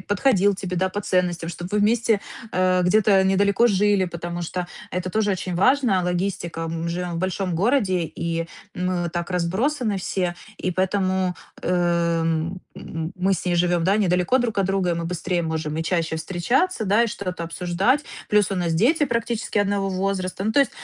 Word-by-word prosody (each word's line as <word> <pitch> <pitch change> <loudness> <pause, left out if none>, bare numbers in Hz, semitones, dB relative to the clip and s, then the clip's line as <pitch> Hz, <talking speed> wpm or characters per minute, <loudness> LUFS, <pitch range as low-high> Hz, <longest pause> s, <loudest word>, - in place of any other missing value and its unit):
подходил 205 0 +2
тебе, 185 -1 -4
да, 190 +1 +1
по 205 +2 -4
ценностям, 180 -3 0
чтобы 175 +2 -7
вы 210 - +2
вместе, 225 0 +2 0.3
а, 185 0 +2
где-то 195 +1 +4
недалеко 200 +4 +3
жили. 205 -2 +3
Потому 175 0 -5
что 175 +1 -4 0.2
это 180 0 -2
тоже 210 -1 +1
очень 180 -1 -3
важно- 230 -4 +3
логистика, 175 -2 -2
мы 165 +1 -3
живем 175 0 -3
в - - -2
большом 185 -1 -1
городе, 195 -4 +2
и 165 +1 -3 0.3
мы 180 -1 -1
так 170 +1 -3
разбросаны 205 - 0
все, 180 -1 -2 0.2
и 185 - -2
поэтому, 185 0 0 0.3
э, 180 - 0 0.5
м, 165 +3 -1 0.2
м, 165 +2 -5
мы 190 +2 +2
с - - -5
ней 175 -1 +1
живем, 175 -1 +2
да, 195 +3 +3
недалеко 180 +4 +2
друг 230 -4 -1
от 195 - +2
друга, 195 -2 +1
и - - +1
мы 170 0 -3
быстрее 175 +1 -1
можем 160 -1 -3
и 165 - -1
чаще 165 -2 -1
встречаться, 220 - 0
да, 210 +4 +4
и - - 0
что-то 180 -4 -5
обсуждать. 180 - 0 0.2
Плюс 205 -2 +3
у - - 0
нас 175 -2 0
дети 275 - +3
практически 230 -3 -1
одного 200 -1 +1
возраста. 190 0 -2
Ну 220 - +1
то 285 - +5
есть, 275 - +2
185 Hz, 185 wpm, -23 LUFS, 175-205 Hz, 0.5 s, то